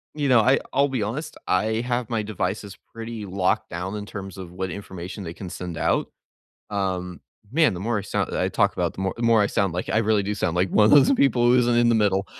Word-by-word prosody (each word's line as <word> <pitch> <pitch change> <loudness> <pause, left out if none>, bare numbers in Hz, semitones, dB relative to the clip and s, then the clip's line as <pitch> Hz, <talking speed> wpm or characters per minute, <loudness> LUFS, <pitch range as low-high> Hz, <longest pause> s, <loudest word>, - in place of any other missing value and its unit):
you 145 -2 -1
know, 120 -3 +6
I 130 +5 +4
I'll 140 +1 +3
be 130 -5 -1
honest, 145 +9 -5
I 110 +4 +1
have 120 -1 -2
my 115 -2 -1
devices 100 -1 -4 0.2
pretty 115 -1 -6
locked 95 -1 0
down 90 +4 -4
in 105 -1 -5
terms 95 -2 -8
of 90 -2 -8
what 95 +1 -4
information 95 -1 -7
they 85 -2 -6
can 90 0 -8
send 90 -2 -6
out. - - 0 0.6
Um, 90 -4 -3 0.3
man, 155 -2 +3
the 90 - -6
more 115 +3 -1
I - - -4
sound 100 - -2
that - - -2
I - - +1
talk - - +2
about, - - -1
the - - -8
more 95 0 -1
more 115 -2 +4
I - - +3
sound 100 -3 0
like 90 - -3
I - - +2
really 110 -2 +2
do 100 +1 -2
sound 90 -4 -1
like 90 +2 +2
one 105 - +4
of - - +4
those 145 -2 +6
people 125 - +3
who 125 +1 +5
isn't 120 -1 +2
in 120 0 +4
the 120 - +4
middle. 100 -3 +2
105 Hz, 250 wpm, -24 LUFS, 95-120 Hz, 0.6 s, know